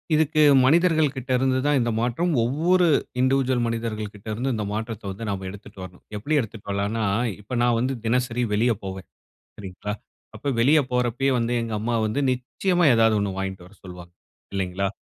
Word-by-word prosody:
இதுக்கு 155 0 +2 0.2
மனிதர்கள்கிட்ட 150 -4 +2
இருந்து 130 0 +1
தான் 145 -1 +3
இந்த 120 -1 0
மாற்றம் 125 +9 0
ஒவ்வொரு 170 +8 +2 0.3
இன்டிவிஷூவல் 130 -1 +2
மனிதர்கள்கிட்ட 110 -3 -4
இருந்து, 125 +4 -1
இந்த 105 -2 -3
மாற்றத்த 110 0 -4
வந்து 100 +4 -7
நாம் 95 -1 -3
எடுத்துட்டு 100 0 -12
வரணும். 90 -1 -12
எப்பிடி 145 +9 -1
எடுத்துட்டு 110 -4 -6
வரலான்னா, 100 +3 -1 0.4
இப்ப 105 +5 -6
நான் 120 -1 +3
வந்து 130 +2 0
தினசரி 125 +1 0
வெளிய 115 +3 +3
போவேன். 95 -2 -7 0.5
சரிங்களா. 100 +1 -6 0.4
அப்ப 140 - -2
வெளிய 145 +6 +5
போறப்பயே 125 +2 +1
வந்து 120 +1 0
எங்க 115 -1 -4
அம்மா 115 +2 -1
வந்து 110 +5 -1
நிச்சயமா 175 +8 0
ஏதாவது 115 -1 +4
ஒன்னு 100 -1 -1
வாங்கிட்டு 95 -2 -5
வர 100 - -19
சொல்வாங்க. 90 -2 -11 0.4
இல்லைங்களா? 95 0 -1
115 Hz, 160 wpm, -24 LUFS, 100-130 Hz, 0.5 s, வெளிய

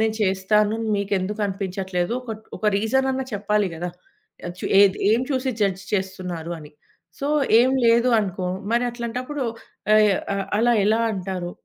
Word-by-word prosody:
నేను 220 0 +1
చేస్తాను 205 +2 +2 0.2
మీకెందుకనిపించట్లేదో 195 -1 -2
ఒకట్ 220 -3 -8
ఒక 215 - -3
రీజనన్నా 265 +5 +1
చెప్పాలి 210 0 +1
గదా! 175 +2 -4 0.6
ఆహ్, 175 - -6
చు - - -7 0.2
ఏది, 200 -1 +5
ఏం 225 +2 +3
చూసి 260 -1 0
జడ్జ్ 195 -2 0
చేస్తున్నారు 185 -4 -3
అని. 150 -2 -12 0.5
సో, 280 - -3 0.3
ఏం 255 +2 +4 0.2
లేదు 235 +2 +4
అనుకో, 190 -3 -2 0.2
మరట్లాంటప్పుడూ 245 +3 -2 0.5
ఆహ్, 210 -2 +5 0.4
అలా 240 +2 +4
ఎలా 220 +2 +3
అంటారు. 185 -2 -4
210 Hz, 130 wpm, -23 LUFS, 190-230 Hz, 0.6 s, ఏది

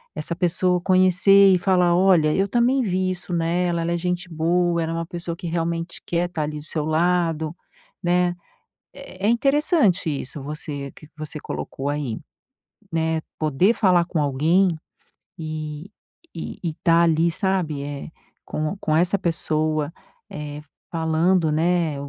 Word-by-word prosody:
essa 155 +2 -3
pessoa 180 0 +1
conhecer 185 +2 +5
e - - +4
falar: 180 -2 +3
“Olha 175 -4 +4
eu 195 +4 +1
também 245 +5 +2
vi 185 -3 0
isso 180 0 -6
nela, 170 +1 0
ela 170 - -1
é - - 0
gente 180 +1 -3
boa, 170 +1 +1
ela 165 - -3
é - - -3
uma 165 0 -2
pessoa 170 -1 -5
que 175 0 -7
realmente 165 0 -3
quer 175 +1 -1
tá 155 -4 -3
ali 150 0 -4
do 150 - -12
seu 155 -1 -3
lado”, 165 -1 +1 0.5
né? 175 0 +2 0.6
É 200 -9 -12
é - - +3
é - - +4
interessante 275 - +2
isso 140 -1 -4
você 145 -1 -6
que 155 - -14
você 155 0 -6
colocou 140 -1 -5
aí, 145 -6 -3 0.7
né, 160 0 0 0.2
poder 155 +7 +3
falar 180 -5 +3
com 170 -2 -2
alguém 160 +6 +2 0.6
e 155 +2 -6 0.4
e 165 - -6
e 165 -3 -2
tá 170 -1 +5
ali, 165 0 +3
sabe? 180 -7 -1
É 145 +1 -6 0.4
com 155 +5 -3
com 155 - +1
essa 180 +4 +2
pessoa, 155 -2 -1 0.4
eh, 150 -1 -6 0.4
falando, 165 +1 +2
né, 165 0 +1
170 Hz, 155 wpm, -23 LUFS, 155-180 Hz, 0.7 s, conhecer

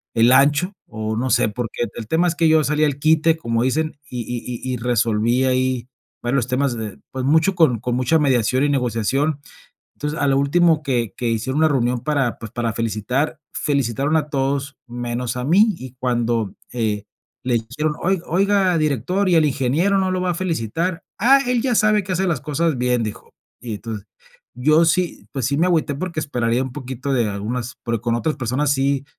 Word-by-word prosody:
el 115 +2 +5
ancho, 145 +8 +4
o 110 0 -4
no 125 +4 -1
sé, - - +3
porque 120 +2 -3
el 110 - -6
tema 165 +7 +2
es 170 - 0
que 165 -1 +3
yo 155 -1 +4
salí 150 +1 +1
al 145 -2 0
quite, 160 +2 +3
como 115 -6 -1
dicen, 155 +5 0
y 125 -1 -4
y 120 +2 -5
y - - -1
y - - -2
resolví 120 +1 +1
ahí, 130 -1 0 0.3
bueno, 120 +2 -1
los 125 -2 0
temas 130 0 0
de 110 -3 -6
pues, 130 -1 -4
mucho 160 +6 +3
con 155 -10 +3
con 120 +2 -2
mucha 130 +6 +2
mediación 130 -2 +2
y - - +1
negociación. 135 +3 0 0.6
Entonces, 150 +2 -4
a 145 - +2
lo 135 0 +3
último 160 +3 +3
que 120 -6 -1
que 120 - -2
hicieron 115 +5 -1
una 160 0 +4
reunión 125 -4 0
para, 140 -6 0
pues, 115 - -8
para 120 -2 -1
felicitar, 115 +7 -1
felicitaron 140 +1 0
a 150 -1 -1
todos 140 0 -1
menos 120 0 -4
a 125 - -3
mí, 200 - +4
y 130 -1 -9
cuando, 120 -4 0 0.2
eh, 110 -4 -1 0.4
le 125 -1 +1
dijeron: 125 +7 -1
"Oi 190 0 +1
oiga 190 0 +2
director, 155 - 0
¿y 180 - +3
el 160 - +5
ingeniero 145 +8 +1
no 190 -1 +1
lo 185 0 -1
va 180 - 0
a - - -1
felicitar?". 165 - -2 0.2
"Ah, 265 +6 +5
él 250 -1 +1
ya 255 -2 +1
sabe 215 -1 +3
que 190 0 -4
hace 190 +2 0
las 165 -8 0
cosas 155 0 -1
bien", 125 -1 +1
dijo. 110 -2 -6 0.3
Y 115 -3 -5
entonces, 110 -1 -7 0.5
yo 155 +6 +4
sí, 175 +2 0
pues, 135 -3 -3
sí 140 +1 0
me 170 - +3
agüité, 160 -5 +1
porque 165 +2 -3
esperaría 120 -4 0
un 130 -1 -5
poquito 130 0 -5
de 120 -4 +2
algunas 115 +4 -4
porque 115 -2 -1
con 115 0 -1
otras 155 +6 -1
personas 135 +2 0
sí 140 0 0
135 Hz, 200 wpm, -21 LUFS, 120-160 Hz, 0.6 s, el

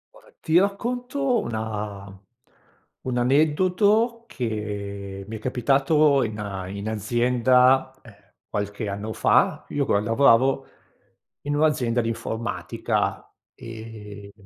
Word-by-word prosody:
Guarda, - - -19
ti 160 +2 +2
racconto 245 +5 0
una 105 - -5 0.9
un 125 -1 -1
aneddoto 185 - +2
che 100 -4 -5
mi 110 - -6
è - - -12
capitato 140 +4 +2
in 110 -2 -4
a 95 -3 -5
in 100 +2 -5
azienda, 125 +4 +3
ehm, 100 -3 -19 0.2
qualche 105 +1 -3
anno 105 +2 -4
fa: - - +2
io 140 -1 -1
qua 100 - +2
lavoravo 130 +4 +3 0.8
in 145 +1 -2
un'azienda 130 -6 +2
di 115 - -3
informatica 115 0 -3 0.2
e 105 -3 -10
120 Hz, 110 wpm, -24 LUFS, 105-145 Hz, 0.9 s, azienda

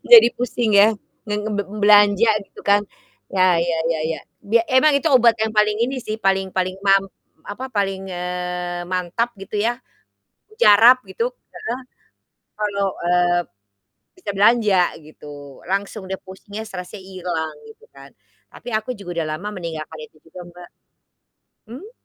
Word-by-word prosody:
Jadi 450 - +11
pusing, 240 -2 -1
ya? 210 - +7 0.4
Nge 210 - -1
nge 215 - -4
be 205 - 0 0.2
belanja 205 +1 +6 0.2
gitu - - -14
kan. 205 0 +4 0.5
Ya 185 -2 +3
ya 170 -1 0
ya 160 - -3 0.2
ya. - - -11 0.2
Bia 225 +3 +2
emang 260 +4 +4
itu 300 +3 +1
obat 235 -3 +5
yang 220 0 -1
paling 210 0 +3
ini 265 +2 -3
sih, 215 -2 -5
paling 195 -2 0
paling 185 0 -1
mam 195 0 +5 0.4
apa, 255 +6 -6
paling, 195 -2 -2
eee, 180 0 -4
mantap 185 +6 -2
gitu 200 +2 -6
ya. 240 +3 -1 0.7
Mujarab 245 - +6
gitu 470 +1 -2 0.3
heeh, 260 - -5 0.8
kalau, 200 -2 -1 0.2
eee, 175 0 +3 0.8
bisa 360 - -5
belanja 210 -2 +4 0.2
gitu, 145 -2 -13
langsung 200 +2 -2
dia, 190 - -3
pusingnya, 200 +3 -9
stresnya 180 +1 -8
hilang 180 -4 -5 0.2
gitu 220 - -17
kan? 140 0 -14 0.4
Tapi 245 - -10
aku 215 +3 -2
juga 175 -4 -4
udah 155 - -3
lama 205 +4 -6
meninggalkan 160 -2 -6
itu 155 - -27
juga, 165 +2 -11
Mbak. 175 0 -14 1.0
Mmm? 330 - -10
195 Hz, 150 wpm, -21 LUFS, 180-220 Hz, 1.0 s, Jadi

